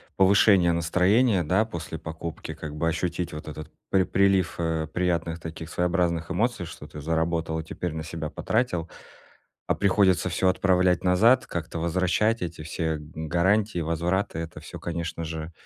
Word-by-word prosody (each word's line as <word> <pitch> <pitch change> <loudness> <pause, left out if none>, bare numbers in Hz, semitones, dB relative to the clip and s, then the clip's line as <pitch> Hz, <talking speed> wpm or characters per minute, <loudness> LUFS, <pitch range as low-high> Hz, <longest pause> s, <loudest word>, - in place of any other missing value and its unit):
повышения 95 -2 +5
настроения, 90 +5 +3
да, 95 +8 +2
после 85 -6 -6
покупки, 80 0 -6
как 75 -1 -7
бы 80 +2 0
ощутить 85 +1 -2
вот 75 0 -7
этот 75 0 -8 0.2
при 95 -1 +4
прилив, 95 -2 +2
э, 80 -2 -1
приятных 85 -1 -1
таких 80 0 -7
своеобразных 85 -1 0
эмоций, 110 -1 0
что 80 -3 -10
ты 75 0 -9
заработал 80 0 -1
и 80 - -6
теперь 90 +2 -4
на 80 0 -4
себя 80 -2 -5
потратил. 90 -8 -1 0.8
А - - +2
приходится 95 -2 +3
всё 95 +2 +1
отправлять 90 -1 +3
назад, 105 +8 +4
как-то 85 -1 -4
возвращать 95 +6 +1
эти 85 -2 -5
все 80 0 -2
г 75 - -10 0.2
гарантии, 95 +4 +2
возвраты. 85 +3 -1
Это 80 0 -6
всё, - - -9
конечно 85 -1 -4
же, 80 +1 -5
85 Hz, 155 wpm, -26 LUFS, 80-95 Hz, 0.8 s, повышения